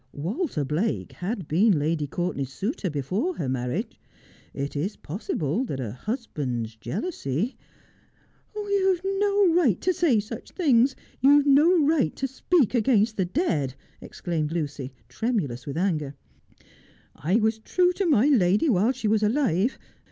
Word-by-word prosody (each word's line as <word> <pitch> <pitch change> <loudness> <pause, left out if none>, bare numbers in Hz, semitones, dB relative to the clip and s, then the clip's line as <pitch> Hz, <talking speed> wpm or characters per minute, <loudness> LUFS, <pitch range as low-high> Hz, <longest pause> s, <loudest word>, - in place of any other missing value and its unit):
Walter 175 - -2
Blake 170 +11 -1
had 185 -2 -4
been 190 +3 +3
Lady 150 0 -1
Cour 175 +4 -2
tenay's 135 -1 -4
suitor 200 - -3
before 185 - -2
her 135 - -3
marriage. 125 -1 -3 0.5
It 140 +2 -5
is 175 +9 -2
possible 165 - -3
that 140 - -4
a 115 -5 -4
husband's 125 - -4
jealousy 165 - -3 0.4
' - - -36
' - - -38
You 400 -2 +1
have 355 +2 -13
no 405 -3 +3
right 285 - +3
to 370 - +2
say 330 -11 +3
such 210 +2 -7
things. 265 -6 +3 0.2
You 270 - +5
have 290 - +3
no 300 +3 +5
right 295 - +2
to 270 - -2
speak 270 - +1
against 220 -2 +2
the 190 - 0
dead,' 160 - -1 0.3
exclaimed 160 -4 -3
Lucy, 145 -5 -3 0.2
tremulous 145 - -2
with 140 +2 -4
anger. 155 -6 -1 0.6
' - - -28 0.2
I 170 +7 -1
was 220 0 +2
true 360 +10 +2
to 385 0 -1
my 270 -7 +4
lady 215 - +3
while 220 +3 +3
she 245 -4 -3
was 215 0 +2
alive. 220 - +1
210 Hz, 160 wpm, -25 LUFS, -, 0.6 s, You